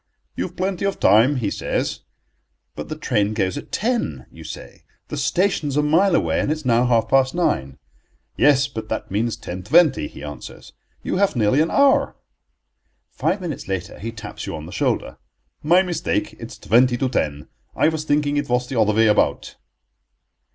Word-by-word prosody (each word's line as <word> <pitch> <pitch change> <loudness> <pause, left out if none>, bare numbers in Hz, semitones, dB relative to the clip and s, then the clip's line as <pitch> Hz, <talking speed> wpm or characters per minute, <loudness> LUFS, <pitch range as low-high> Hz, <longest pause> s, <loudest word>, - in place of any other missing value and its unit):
"You've 175 - -4
plenty 185 0 -2
of 195 -1 -2
time," 115 +7 +5
he 110 -6 -1
says - - -2 0.8
"But - - -7
the 155 - -4
train 110 -8 0
goes 95 -4 0
at - - -8
ten," 235 +3 -2
you - - -12
say; - - -10 0.3
"the - - -4
station 180 -5 0
is 140 - -2
a 150 - +3
mile 170 +5 +3
away, - - +1
and - - -1
it - - +3
is 155 - -11
now 120 0 +3
half 115 -2 +2
past 130 +4 +2
nine." 70 - -1 0.6
"Yes, 140 0 +4
but 110 -5 -7
that - - -4
means 110 +3 -1
ten 90 +1 -7
twenty," 155 - +3
he - - -12
answers, 75 -1 -9 0.3
"you - - -2
have 200 -4 +2
nearly 120 +5 +3
an 160 - +1
hour." 280 -1 +3 1.0
Five 195 - -1
minutes 165 -6 -5
later 95 -2 -4
he 115 +2 -5
taps 105 -2 -8
you - - -4
on 80 0 -7
the 85 - -10
shoulder. - - -1 0.4
"My 175 +5 +4
mistake, 175 -3 -2
it's - - -9
twenty 120 +3 +3
to 130 - 0
ten. 75 - -2 0.3
I - - +3
was 160 -1 -3
thinking 145 -1 +1
it 145 -2 -2
was 125 0 +1
the 125 -4 0
other 105 0 +2
way 115 +1 +4
about." 105 -1 +1
130 Hz, 185 wpm, -21 LUFS, 110-160 Hz, 1.0 s, time